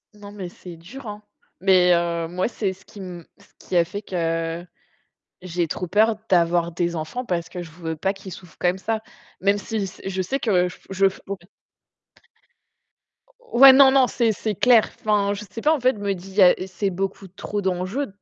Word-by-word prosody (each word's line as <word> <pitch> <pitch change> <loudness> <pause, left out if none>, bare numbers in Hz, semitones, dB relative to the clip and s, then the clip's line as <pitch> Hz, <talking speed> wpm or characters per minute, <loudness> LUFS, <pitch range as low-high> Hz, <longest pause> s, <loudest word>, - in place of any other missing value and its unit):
Non, 205 -1 -11
mais 200 -3 -6
c'est 175 0 -11
dur, 220 +10 -11
hein. 210 0 -7 0.4
Mais 185 -1 +5
heu, 170 -1 -1
moi, 180 +2 -1
c'est 205 -5 -2
ce 190 +2 -21
qui 205 - -14
m 180 -3 -8
ce 200 - -21
qui - - -6
a 170 - +6
fait 200 +4 -6
que 165 -2 -2 0.8
j'ai 175 -2 -2
trop 180 - -3
peur 215 +4 +3
d'avoir 170 -1 +3
des 170 +1 -1
enfants, 160 +11 -4
parce 170 -4 -2
que 180 - -6
je 165 - -11
veux 160 0 -5
pas 190 +5 -1
qu'ils 195 -1 -10
souffrent 180 -2 -12
comme 180 +1 +1
ça. 220 +3 -2 0.4
Même 200 +2 +2
si 205 +1 -3
c 190 - -12
je 190 -1 -2
sais 265 +10 -2
que 180 -5 +2
je 180 - -12
f - - -27
je 195 0 +3
f - - -14
ouais. 200 - -3 2.2
Ouais, 270 +3 +10
non 265 0 +7
non, 265 -1 +5
c'est 235 -3 +1
c'est 215 0 -3
clair. 235 +1 +5
Enfin, 205 -2 +2
je 205 +1 -6
sais 225 +4 -7
pas, 305 +5 +4
en - - -4
fait, 255 -1 +2
je 205 - -10
me 200 -1 0
dis, 185 +1 -11
il - - -14
y 205 - +4
a 180 -1 +7
c'est 190 +2 -2
beaucoup 195 +1 -4
trop 205 +3 -5
d'enjeux. 190 +8 -2
190 Hz, 215 wpm, -23 LUFS, 175-210 Hz, 2.2 s, Ouais